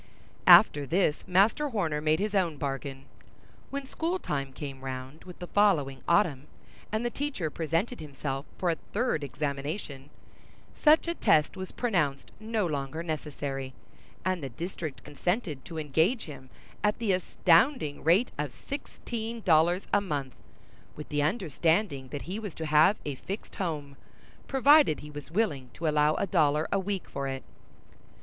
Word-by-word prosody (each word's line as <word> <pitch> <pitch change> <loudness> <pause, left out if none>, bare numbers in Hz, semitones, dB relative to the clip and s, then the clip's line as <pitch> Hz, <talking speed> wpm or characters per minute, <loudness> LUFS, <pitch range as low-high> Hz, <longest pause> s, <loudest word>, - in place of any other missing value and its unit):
After 175 -6 +8
this, 165 -2 +1
Master 210 +11 +3
Horner 165 - -1
made 155 +1 +3
his 210 +1 -1
own 175 -6 +1
bargain. 135 -1 -4 0.6
When 280 0 -4
schooltime 265 - -2
came 135 -1 -7
round 130 +3 -7
with 180 -1 -10
the 180 - -6
following 165 -10 +2
autumn, 170 -7 +2 0.4
and 220 +3 -1
the 240 - 0
teacher 270 - -3
presented 165 - -1
himself 140 -1 -5
for 175 -2 +1
a 165 - -2 0.2
third 210 - 0
examination, 140 +1 -4 0.7
such 310 +2 +5
a 340 - +1
test 155 - +3
was 185 -1 -6
pronounced 160 - -1
no 220 -2 -1
longer 150 0 -3
necessary; 140 -4 -4 0.5
and 185 -2 0
the 135 - -4
district 160 +2 -6
consented 155 - -2
to 165 - -7
engage 160 - +1
him 140 -4 -10 0.3
at 210 0 +2
the 225 -4 0
astounding 180 - +2
rate 180 - +4
of 150 -1 -1
sixteen 230 - -6
dollars 175 +1 +3
a 205 - +5
month, 145 - -3 0.6
with 150 - -9
the 145 -1 0
understanding 160 - 0
that 140 +2 -6
he 190 +5 -4
was 205 -6 -6
to 160 - -4
have 155 +6 +5
a 145 - -2
fixed 195 - -7
home, 150 -7 -3 0.5
provided 280 - +5
he 150 +1 -10
was 145 -1 -8
willing 155 - -1
to 165 - -3
allow 150 0 +3
a - - 0
dollar 155 -4 +2
a 200 - +2
week 195 -1 -3
for 140 0 -4
it. 135 0 -4
160 Hz, 155 wpm, -29 LUFS, 145-205 Hz, 0.7 s, After